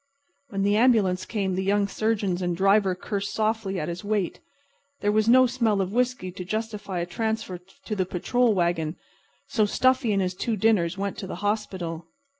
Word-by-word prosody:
When 195 -3 -2
the 205 +1 +3
ambulance 215 -7 +3
came 195 -4 -1
the 190 +1 -1
young 200 +1 +2
surgeon 215 -1 0
and 175 -1 0
the - - -5
driver 195 0 +3
cursed 200 +2 -3
softly 215 -3 0
at 155 - -3
his 175 +3 -5
weight. 205 -4 -1 0.6
There 205 - +2
was 215 +1 +2
no 255 +2 +7
smell 235 -5 +1
of 190 +1 -1
whiskey 245 -6 0
to 180 - -7
justify 210 -1 -4
a - - -1
transfer 220 -1 -3
to 190 +4 -8
the 185 -3 -1
patrol 230 +5 +1
wagon, 170 -3 0 0.5
so 215 -2 +2
Stuffy 255 0 +2
and 200 - +2
his 180 0 -1
two 220 +4 -2
dinners 185 -4 +2
went 200 0 -3
to 190 - -5
the - - -5
hospital. 180 -6 -2
200 Hz, 190 wpm, -25 LUFS, 185-220 Hz, 0.6 s, no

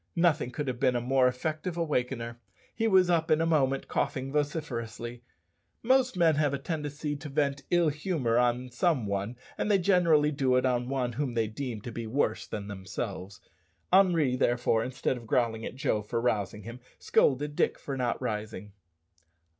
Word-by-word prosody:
Nothing 165 -6 +2
could 145 +3 -4
have 125 -2 -3
been 125 - +2
a - - +2
more 130 +1 +3
effective 155 +7 -3
awakener. 125 -7 -2 0.3
He 225 0 0
was 190 -4 +5
up 170 -1 +1
in 155 0 +4
a 165 - +2
moment 135 -5 +1
coughing 135 +1 -2
vociferously. 120 -6 -3 0.6
Most 255 -2 +3
men 165 -2 +5
have 145 -2 +2
a - - -2
tendency 150 0 -4
to 150 +1 -8
vent 140 -1 0
ill 175 -2 +3
humour 150 -6 -1
on 125 +1 0
some 130 -1 +1
one, 100 +3 -2 0.2
and - - 0
they 205 - +5
generally 170 -5 +3
do 135 -3 +1
it 125 - +2
on 125 -1 0
one 130 -3 -1
whom 130 -1 -2
they 115 -1 +2
deem 110 0 -5
to 120 - -7
be 115 0 -5
worse 135 +6 0
than 100 -2 -5
themselves. 95 0 -6 0.5
Henri, 170 -9 +4
therefore, 120 -2 +1
instead 130 +1 -2
of 115 -2 -11
growling 115 -1 +1
at - - -8
Joe 110 -5 0
for 115 +3 -3
rousing 105 -3 -1
him, 115 +3 -8 0.2
scolded 145 +2 +2
Dick - - +1
for 140 - -5
not 125 -2 -1
rising. 105 -4 -4
130 Hz, 180 wpm, -29 LUFS, 120-155 Hz, 0.6 s, was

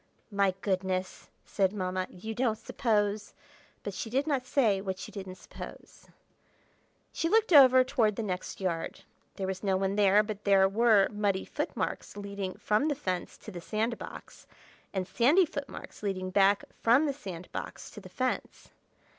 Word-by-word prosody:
"My 200 -2 +2
goodness!" 185 -1 -2 0.2
said 190 -2 +1
Mamma. 185 -2 -2
"You 220 +5 -7
don't 230 -1 0
suppose—" 210 -5 -1 0.5
but 205 - -4
she 225 - -5
did 270 +5 +1
not 270 -5 -1
say 215 -8 +2
what 190 -1 -4
you - - -12
didn't 190 -3 -7
suppose. - - -11 1.1
She 330 - 0
looked 440 -2 +3
over 260 -3 +8
toward 225 -5 +1
the 225 - -3
next 185 -3 -4
yard. 170 -4 -3 0.3
There 195 - -3
was 190 0 -3
no 195 -2 +1
one 195 +1 0
there, 205 0 +5
but 210 -1 -6
there 195 -1 +5
were 215 -1 +4
muddy 205 -2 -1
footmarks - - -4
leading 200 -2 -5
from 215 +8 +1
the 295 - +1
fence 185 -10 -3
to 215 - -10
the 175 -3 -7
sand 220 +5 -1
box, - - -10 0.4
and 190 -2 -2
sandy 290 - +4
footmarks 285 -3 -8
leading 185 -2 -2
back 200 +1 +4 0.2
from 245 +7 +5
the 285 - 0
sand 185 -10 -8
box - - -6
to - - -10
the - - -12
fence. - - -3
205 Hz, 165 wpm, -30 LUFS, 190-235 Hz, 1.1 s, over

